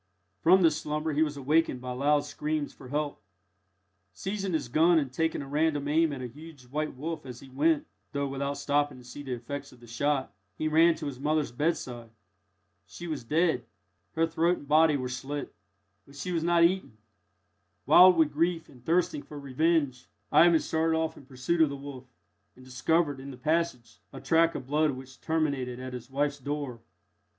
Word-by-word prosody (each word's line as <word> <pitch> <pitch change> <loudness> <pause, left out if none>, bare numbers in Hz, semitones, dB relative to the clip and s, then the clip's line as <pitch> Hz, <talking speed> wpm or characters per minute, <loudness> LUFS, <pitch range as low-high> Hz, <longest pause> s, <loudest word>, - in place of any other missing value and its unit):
From 185 +2 +6
this 160 -2 +4
slumber 150 +1 -2
he 150 - +1
was 150 -2 0
awakened 145 0 +1
by 125 0 -6
loud 145 +3 +2
screams 150 0 -3
for 130 - -13
help. 145 -2 -3 0.9
Seizing 195 - -3
his 155 -6 -1
gun, 165 +7 +4
and 140 -5 -1
taking 160 0 -1
a - - -10
random 145 0 0
aim 160 +1 +3
at 135 -3 -5
a - - -3
huge 150 +2 -13
white 150 +4 -3
wolf 160 +5 -5
as 125 -2 -9
he 135 - -13
went 150 +4 +2 0.3
(though 140 -1 -1
without 140 +1 -3
stopping 145 -1 0
to 125 - -13
see 125 +4 -9
the 135 -3 -4
effects 135 +4 -6
of 125 - -17
the 120 - -15
shot), 130 0 -1 0.2
he 155 - -1
ran 165 +2 +5
to 160 -1 -7
his 135 -3 -5
mother's 150 -2 0
bedside. 120 -4 -2 0.8
She 175 - -9
was 155 -6 -4
dead. 160 +7 +1 0.5
Her 165 0 +3
throat 170 +2 +1
and 145 - -12
body 155 0 +5
were 130 -2 -3
slit; 135 +3 -5 0.5
but 140 - -16
she 160 +6 -4
was 165 -2 0
not 170 0 +4
eaten. 175 - +1 0.9
Wild 180 +4 +8
with 155 -3 +3
grief 165 +1 0
and 125 -3 -17
thirsting 165 0 +1
for 150 - -11
revenge, 140 -1 0 0.2
Ivan 170 -1 +6
started 160 0 +1
off 160 0 -1
in 135 - -15
pursuit 135 +6 -1
of 155 - +5
the 140 - -5
wolf, 135 -2 -9 0.5
and 130 - -16
discovered, 145 +3 0
in 135 +1 -8
the 130 - -9
passage, 150 -6 -1
a - - -8
track 165 0 +3
of - - -5
blood 150 +3 +2
which 130 +1 -11
terminated 140 -6 -1
at 130 0 -6
his 125 0 -8
wife's 145 +1 -1
door. 140 -3 -4
145 Hz, 190 wpm, -28 LUFS, 130-160 Hz, 0.9 s, Wild